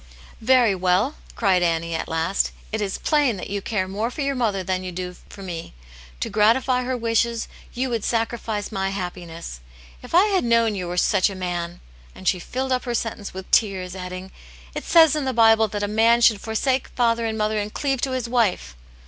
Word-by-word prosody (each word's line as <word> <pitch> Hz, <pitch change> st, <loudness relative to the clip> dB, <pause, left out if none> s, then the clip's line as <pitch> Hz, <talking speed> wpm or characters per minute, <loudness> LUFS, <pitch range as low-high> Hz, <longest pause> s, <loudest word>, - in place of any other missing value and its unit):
"Very 245 Hz, -2 st, +4 dB
well!" 185 Hz, +8 st, +1 dB, 0.2 s
cried 190 Hz, -5 st, +2 dB
Annie, 165 Hz, -1 st, 0 dB
at 160 Hz, -, -3 dB
last. 165 Hz, +4 st, 0 dB, 0.2 s
"It 220 Hz, 0 st, -2 dB
is 195 Hz, -2 st, -2 dB
plain 290 Hz, -8 st, +2 dB
that 185 Hz, -, -7 dB
you 200 Hz, 0 st, -2 dB
care 190 Hz, -3 st, -1 dB
more 210 Hz, +5 st, -2 dB
for 270 Hz, -, -6 dB
your 275 Hz, 0 st, 0 dB
mother 215 Hz, -7 st, 0 dB
than 185 Hz, 0 st, -2 dB
you 185 Hz, -, -5 dB
do 180 Hz, 0 st, -5 dB
for 200 Hz, -, -10 dB
me. 170 Hz, -, -7 dB, 0.5 s
To -, -, 0 dB
gratify 235 Hz, +5 st, +3 dB
her 255 Hz, 0 st, -2 dB
wishes 230 Hz, 0 st, 0 dB, 0.3 s
you 255 Hz, +1 st, -1 dB
would 230 Hz, -3 st, -1 dB
sacrifice 225 Hz, -2 st, -2 dB
my 195 Hz, -2 st, -1 dB
happiness. 175 Hz, -, -6 dB, 0.4 s
If 250 Hz, -, -5 dB
I 365 Hz, +4 st, +7 dB
had 375 Hz, -, +2 dB
known 230 Hz, -2 st, +3 dB
you 185 Hz, -3 st, -4 dB
were 175 Hz, +1 st, -4 dB
such 195 Hz, +1 st, +3 dB
a 195 Hz, -, -7 dB
man 175 Hz, -2 st, -4 dB, 0.2 s
" -, -, -25 dB
and 185 Hz, -, -9 dB
she 185 Hz, -, +3 dB
filled 260 Hz, +8 st, -4 dB
up 255 Hz, 0 st, 0 dB
her 240 Hz, -1 st, -2 dB
sentence 220 Hz, -3 st, -3 dB
with 190 Hz, 0 st, -8 dB
tears, 190 Hz, -4 st, +1 dB
adding, 185 Hz, 0 st, -7 dB, 0.4 s
"It -, -, -5 dB
says 320 Hz, -3 st, +6 dB
in 300 Hz, -3 st, -1 dB
the 260 Hz, -, -1 dB
Bible 225 Hz, -1 st, +5 dB
that 205 Hz, 0 st, -4 dB
a -, -, 0 dB
man 225 Hz, +3 st, +4 dB
should 220 Hz, -4 st, +5 dB
forsake 255 Hz, +4 st, 0 dB
father 230 Hz, -1 st, +2 dB
and 220 Hz, 0 st, -3 dB
mother, 215 Hz, 0 st, 0 dB
and 205 Hz, 0 st, -3 dB
cleave 270 Hz, -1 st, -1 dB
to 265 Hz, -, -1 dB
his 255 Hz, -2 st, -2 dB
wife." 210 Hz, -, 0 dB
215 Hz, 210 wpm, -23 LUFS, 185-240 Hz, 0.5 s, I